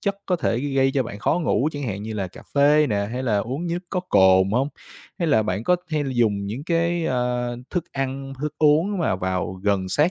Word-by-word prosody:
chất 200 Hz, -1 st, -1 dB
có 180 Hz, -, +1 dB
thể 120 Hz, -7 st, 0 dB
gây 135 Hz, -1 st, +1 dB
cho 135 Hz, -, +3 dB
bạn 105 Hz, -3 st, -7 dB
khó 160 Hz, -, +1 dB
ngủ, 150 Hz, 0 st, +2 dB
chẳng 145 Hz, 0 st, -5 dB
hạn 105 Hz, -5 st, -3 dB
như 110 Hz, +1 st, -5 dB
là 95 Hz, -3 st, -2 dB
cà -, -, -13 dB
phê 145 Hz, +1 st, +5 dB
nè, 100 Hz, -1 st, 0 dB
hay 125 Hz, -, -3 dB
là 110 Hz, -5 st, +1 dB
uống 130 Hz, +11 st, -3 dB
nước 175 Hz, +1 st, -2 dB
có 180 Hz, -, 0 dB
cồn 95 Hz, -, +4 dB
hông? 135 Hz, +4 st, +1 dB, 0.5 s
Hay 170 Hz, -3 st, 0 dB
là 110 Hz, -6 st, +4 dB
bạn 105 Hz, +1 st, -2 dB
có 180 Hz, -, +4 dB
hay 155 Hz, -2 st, 0 dB
dùng 110 Hz, -6 st, +1 dB
những 120 Hz, +8 st, -5 dB
cái, 170 Hz, 0 st, 0 dB
ơ, 125 Hz, -1 st, -1 dB
thức 175 Hz, -3 st, -1 dB
ăn, 135 Hz, 0 st, -3 dB
thức 150 Hz, 0 st, -2 dB
uống 160 Hz, +7 st, +3 dB
mà 155 Hz, -, +1 dB
vào 95 Hz, 0 st, -2 dB
gần 100 Hz, -2 st, +1 dB
sát 150 Hz, -, +2 dB
135 Hz, 230 wpm, -23 LUFS, 105-155 Hz, 0.5 s, phê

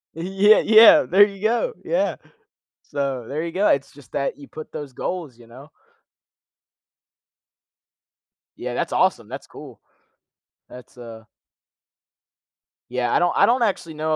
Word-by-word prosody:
E 165 Hz, -, -7 dB, 0.3 s
yeah, 215 Hz, -, +7 dB
yeah, 230 Hz, +8 st, +7 dB
there 200 Hz, +3 st, +5 dB
you 200 Hz, -2 st, -10 dB
go. 240 Hz, -, 0 dB
Yeah. -, -, -1 dB, 0.7 s
So 135 Hz, -4 st, -4 dB
there 155 Hz, +4 st, -4 dB
you 165 Hz, -, -5 dB
go. 195 Hz, +4 st, 0 dB
It's 140 Hz, 0 st, 0 dB
just 140 Hz, -1 st, -18 dB
that 140 Hz, -, -3 dB
you 140 Hz, -, -13 dB
put 155 Hz, 0 st, -11 dB
those 140 Hz, -3 st, -8 dB
goals, 160 Hz, -5 st, -6 dB
you 120 Hz, -, -18 dB
know. 135 Hz, +6 st, -15 dB, 2.9 s
Yeah, -, -, -6 dB
that's -, -, -3 dB
awesome. -, -, 0 dB
That's -, -, -9 dB
cool. -, -, -13 dB, 0.9 s
That's, 125 Hz, 0 st, -15 dB
uh 115 Hz, -2 st, -11 dB, 1.7 s
Yeah, 125 Hz, -1 st, -2 dB
I -, -, +3 dB
don't 175 Hz, 0 st, +1 dB
I -, -, +5 dB
don't 245 Hz, +2 st, +1 dB
actually 190 Hz, -7 st, -2 dB
know 155 Hz, +1 st, -2 dB
155 Hz, 145 wpm, -21 LUFS, 135-205 Hz, 2.9 s, yeah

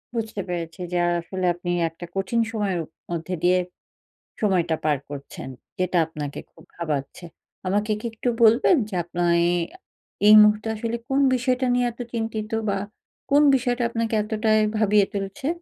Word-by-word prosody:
বুঝতে 220 Hz, -3 st, -3 dB
পেরেছি 170 Hz, 0 st, -4 dB
যে, 180 Hz, -, 0 dB
আ -, -, +2 dB
আসলে 185 Hz, +2 st, -4 dB
আপনি 175 Hz, 0 st, -6 dB, 0.2 s
একটা 165 Hz, +2 st, -10 dB
কঠিন 195 Hz, +5 st, 0 dB
সময়ের 205 Hz, -5 st, -1 dB, 0.3 s
মধ্যে 170 Hz, +1 st, -3 dB
দিয়ে 180 Hz, +1 st, +4 dB, 0.8 s
সময়টা 180 Hz, -6 st, +1 dB
পার 150 Hz, -2 st, +2 dB
করছেন। 140 Hz, -2 st, -8 dB, 0.3 s
যেটা 185 Hz, 0 st, 0 dB
আপনাকে 150 Hz, -3 st, -6 dB
খুব -, -, -18 dB
ভাবাচ্ছে। 155 Hz, -1 st, -4 dB, 0.4 s
আমাকে 205 Hz, +3 st, 0 dB
কি -, -, -14 dB
একটু 225 Hz, +2 st, -3 dB
বলবেন 230 Hz, +10 st, +6 dB
যে, 210 Hz, -, -7 dB
আপনার 175 Hz, 0 st, -1 dB, 0.2 s
এই 175 Hz, -, +2 dB, 0.7 s
এই 210 Hz, -, +9 dB
মুহূর্তে 210 Hz, +1 st, +3 dB
আসলে 230 Hz, +1 st, -3 dB
কোন 270 Hz, +1 st, +2 dB
বিষয়টা 255 Hz, +1 st, +1 dB
নিয়ে 245 Hz, 0 st, +2 dB
এত 235 Hz, -, -19 dB
চিন্তিত? 225 Hz, -2 st, -3 dB, 0.2 s
বা, 200 Hz, -1 st, 0 dB, 0.5 s
কোন 285 Hz, +1 st, +5 dB
বিষয়টা 245 Hz, -1 st, 0 dB
আপনাকে 230 Hz, -1 st, -1 dB
এতটাই 215 Hz, 0 st, +1 dB, 0.2 s
ভাবিয়ে 210 Hz, -2 st, +4 dB
তুলছে? 200 Hz, +7 st, -4 dB
205 Hz, 155 wpm, -24 LUFS, 175-225 Hz, 0.8 s, এই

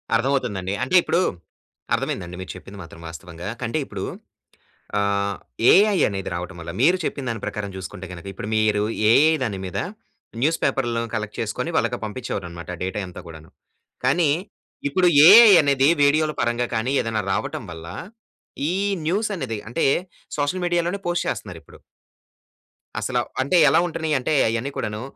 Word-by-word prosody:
అర్థమవుతుందండి. 115 Hz, -7 st, 0 dB
అంటే 130 Hz, -, 0 dB
ఇప్పుడు 175 Hz, -, +1 dB, 0.7 s
అర్థమైందండి 90 Hz, +1 st, -2 dB
మీరు 95 Hz, -, -6 dB
చెప్పింది 95 Hz, +2 st, -11 dB
మాత్రం 85 Hz, 0 st, -13 dB
వాస్తవంగా. 85 Hz, +1 st, -9 dB, 0.2 s
కంటే 125 Hz, +6 st, -1 dB
ఇప్పుడు 100 Hz, -2 st, -6 dB, 1.0 s
ఆహ్, 100 Hz, 0 st, 0 dB, 0.4 s
ఏఐ 205 Hz, +1 st, +5 dB
అనేది 95 Hz, -2 st, -3 dB
రావటం 90 Hz, +1 st, -5 dB
వల్ల 85 Hz, -, -7 dB
మీరు 170 Hz, +8 st, +5 dB
చెప్పిన 140 Hz, -, -3 dB
దాని 115 Hz, -3 st, -4 dB
ప్రకారం 105 Hz, -1 st, -4 dB
చూసుకుంటే 95 Hz, 0 st, -7 dB
గనుక 85 Hz, +1 st, -10 dB
ఇప్పుడు 100 Hz, +2 st, -7 dB
మీరు 110 Hz, -1 st, +2 dB, 0.3 s
ఏఐ 150 Hz, +7 st, +6 dB
దాని 105 Hz, -6 st, -2 dB
మీద 95 Hz, +1 st, -4 dB, 0.6 s
న్యూస్ 160 Hz, +4 st, +2 dB
పేపర్లు 120 Hz, -3 st, 0 dB
కలెక్ట్ 110 Hz, -1 st, -4 dB
చేసుకొని 115 Hz, +7 st, -3 dB
వాళ్ళకి 120 Hz, +1 st, 0 dB
పంపించేవారు 105 Hz, -3 st, -4 dB
అన్నమాట 85 Hz, +1 st, -8 dB
డేటా 95 Hz, +3 st, -2 dB
అంతా 90 Hz, -, -9 dB
కూడాను. 80 Hz, -1 st, -12 dB, 0.5 s
కానీ 145 Hz, +4 st, +3 dB, 0.6 s
ఇప్పుడు 180 Hz, +5 st, +3 dB, 0.2 s
ఏఐ 220 Hz, +2 st, +10 dB
అనేది 140 Hz, -1 st, +3 dB
వీడియోల 155 Hz, +2 st, +3 dB
పరంగా 120 Hz, +1 st, 0 dB
కానీ 115 Hz, +4 st, 0 dB
ఏదైనా 110 Hz, -2 st, -2 dB
రావటం 105 Hz, -, -3 dB
వల్ల 80 Hz, 0 st, -9 dB, 0.8 s
ఈ -, -, -1 dB, 0.3 s
న్యూస్ 205 Hz, +6 st, 0 dB
అనేది 125 Hz, -, -4 dB
అంటే 165 Hz, -, 0 dB, 0.5 s
సోషల్ 145 Hz, +6 st, -1 dB
మీడియాలోనే 175 Hz, +2 st, 0 dB
పోస్ట్ 175 Hz, 0 st, 0 dB
చేస్తున్నారు 90 Hz, -5 st, -5 dB
ఇప్పుడు. -, -, -17 dB, 1.2 s
అసల, -, -, -2 dB, 0.2 s
అంటే 140 Hz, +7 st, +2 dB
ఎలా 155 Hz, +4 st, +4 dB
ఉంటున్నాయంటే 155 Hz, -4 st, -1 dB, 0.2 s
అయన్ని 115 Hz, +5 st, -2 dB
కూడాను, 105 Hz, +1 st, -3 dB
115 Hz, 145 wpm, -23 LUFS, 95-150 Hz, 1.2 s, ఏఐ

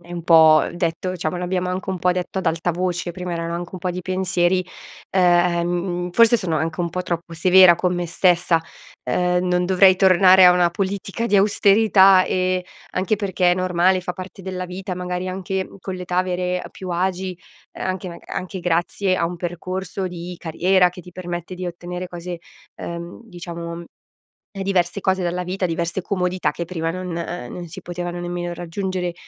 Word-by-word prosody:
è 175 Hz, 0 st, -17 dB
un 170 Hz, -1 st, -5 dB
po' 160 Hz, -2 st, +6 dB
detto 175 Hz, +1 st, -2 dB
diciamo 155 Hz, +1 st, -2 dB
l'abbiamo 180 Hz, 0 st, -2 dB
anche 185 Hz, +1 st, -3 dB
un 185 Hz, -, -3 dB
po' 180 Hz, -, +2 dB
detto 180 Hz, +1 st, -3 dB
ad 190 Hz, -, -4 dB
alta 165 Hz, +2 st, +1 dB
voce, 175 Hz, 0 st, -2 dB
prima 180 Hz, 0 st, -5 dB
erano 170 Hz, 0 st, -3 dB
anche 175 Hz, 0 st, -4 dB
un -, -, -5 dB
po' 180 Hz, 0 st, -2 dB
di 180 Hz, -, -4 dB
pensieri, 185 Hz, 0 st, 0 dB, 0.5 s
ehm, 175 Hz, 0 st, +1 dB
forse 230 Hz, +3 st, +5 dB
sono 170 Hz, -6 st, -1 dB
anche 160 Hz, +3 st, -2 dB
un 170 Hz, -, 0 dB
po' 180 Hz, +2 st, -3 dB
troppo 170 Hz, -1 st, -4 dB
severa 180 Hz, +1 st, +7 dB
con 180 Hz, +1 st, 0 dB
me 175 Hz, 0 st, -2 dB
stessa, 175 Hz, -1 st, +3 dB, 0.4 s
ehm, 180 Hz, 0 st, +1 dB
non 180 Hz, 0 st, +1 dB
dovrei 185 Hz, 0 st, +5 dB
tornare 185 Hz, -1 st, +7 dB
a 180 Hz, -, +8 dB
una 175 Hz, -1 st, +3 dB
politica 195 Hz, +4 st, -3 dB
di 205 Hz, -3 st, +3 dB
austerità 195 Hz, -1 st, +5 dB
e 185 Hz, 0 st, 0 dB, 0.3 s
anche 190 Hz, +3 st, 0 dB
perché 185 Hz, -3 st, +1 dB
è 175 Hz, -, +3 dB
normale, 185 Hz, 0 st, +2 dB
fa 180 Hz, 0 st, -5 dB
parte 185 Hz, +1 st, -9 dB
della 185 Hz, -1 st, -5 dB
vita, 180 Hz, +1 st, -5 dB
magari 180 Hz, 0 st, -4 dB
anche 190 Hz, 0 st, -3 dB
con 190 Hz, -, -5 dB
l'età 180 Hz, -1 st, -4 dB
avere 180 Hz, 0 st, 0 dB
più 185 Hz, -, -9 dB
agi, 185 Hz, +1 st, -2 dB, 0.3 s
ehm, -, -, -6 dB
anche 185 Hz, 0 st, -3 dB
maga 170 Hz, -, -11 dB
anche 185 Hz, 0 st, -4 dB
grazie 175 Hz, +3 st, 0 dB
a 180 Hz, -, 0 dB
un 175 Hz, +1 st, -5 dB
percorso 185 Hz, +2 st, -4 dB
di 175 Hz, 0 st, -7 dB
carriera 180 Hz, +3 st, +2 dB
che 180 Hz, 0 st, -11 dB
ti 180 Hz, -, -14 dB
permette 175 Hz, 0 st, -6 dB
di 180 Hz, 0 st, -5 dB
ottenere 175 Hz, +1 st, -6 dB
cose 175 Hz, 0 st, -6 dB, 0.4 s
ehm, 170 Hz, +4 st, -7 dB
diciamo, 170 Hz, -3 st, -7 dB
ehm, 170 Hz, 0 st, -7 dB, 0.8 s
diverse 185 Hz, -1 st, 0 dB
cose 190 Hz, 0 st, +1 dB
dalla 180 Hz, +1 st, -1 dB
vita, 185 Hz, +1 st, -2 dB
diverse 170 Hz, +2 st, -2 dB
comodità 180 Hz, -1 st, -1 dB
che 170 Hz, -, -5 dB
prima 165 Hz, -2 st, -3 dB
non 185 Hz, +2 st, -4 dB
non 170 Hz, -1 st, -5 dB
si -, -, -10 dB
potevano 175 Hz, 0 st, -5 dB
nemmeno 175 Hz, 0 st, -4 dB
raggiungere. 180 Hz, +1 st, -3 dB
180 Hz, 180 wpm, -21 LUFS, 175-185 Hz, 0.8 s, a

